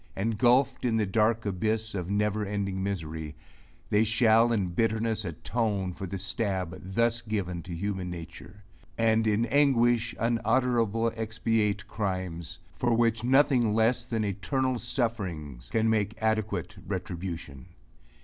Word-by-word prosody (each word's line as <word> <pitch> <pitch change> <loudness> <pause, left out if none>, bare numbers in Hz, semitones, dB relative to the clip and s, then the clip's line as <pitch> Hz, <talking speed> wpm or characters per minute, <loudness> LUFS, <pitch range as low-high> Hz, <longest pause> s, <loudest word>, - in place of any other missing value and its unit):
Engulphed 120 +5 +2
in 115 -3 +1
the 110 - +2
dark 110 +3 +1
abyss 110 +3 -1
of 90 -2 -4
never 105 +1 0
ending 100 -2 -2
misery, 80 -6 -4 0.6
they 105 +1 +4
shall 115 +1 +4
in 100 -6 +1
bitterness 110 +2 0
atone 95 +2 -2
for 95 - -6
the 95 - -4
stab 95 -2 -3
thus 115 0 +2
given 100 -6 -3
to 90 - -10
human 95 0 -3
nature; 90 +4 -9 0.3
and 110 -1 +3
in 110 +2 +2
anguish 120 -3 +3
unutterable 115 -1 +1
expiate 110 -2 -1
crimes, 90 -5 -4 0.2
for 120 -2 +1
which 115 -1 +2
nothing 125 -4 +4
less 115 +2 +2
than 115 -3 -1
eternal 125 +6 -1
sufferings 90 - -3
can 110 0 +1
make 110 0 0
adequate 110 -4 -1
retribution! 85 -6 -5
110 Hz, 130 wpm, -28 LUFS, 95-115 Hz, 0.6 s, they